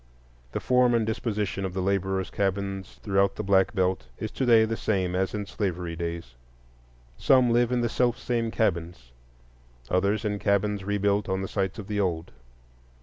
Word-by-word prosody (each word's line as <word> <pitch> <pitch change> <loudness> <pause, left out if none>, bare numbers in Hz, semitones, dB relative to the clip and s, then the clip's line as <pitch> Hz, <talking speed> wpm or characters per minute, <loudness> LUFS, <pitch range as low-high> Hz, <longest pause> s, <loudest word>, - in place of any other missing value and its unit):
The - - -2
form 125 -1 +3
and 115 -2 +2
disposition 105 -3 -2
of 95 -1 -4
the - - -1
laborers' 95 -1 -1
cabins 100 0 -2
throughout 100 -1 +2
the 105 - -4
Black 95 0 +3
Belt 95 - 0
is 110 - -5
to 130 - -2
day 115 -2 +6
the 115 +1 -2
same 95 -5 -1
as 95 +3 0
in 105 -1 -3
slavery 90 -5 -3
days. 85 -6 -5 0.8
Some 130 - +4
live 120 +1 +3
in 125 -1 +1
the 120 - +1
self 120 +1 +1
same 115 -2 -1
cabins, 85 - -2 0.8
others 100 +4 +1
in 105 -1 -1
cabins 100 0 +1
rebuilt 100 +1 0
on 95 0 -1
the - - -3
sites 95 0 -2
of 105 - -6
the 105 0 -2
old. 85 -4 -1
100 Hz, 175 wpm, -26 LUFS, 95-110 Hz, 0.8 s, day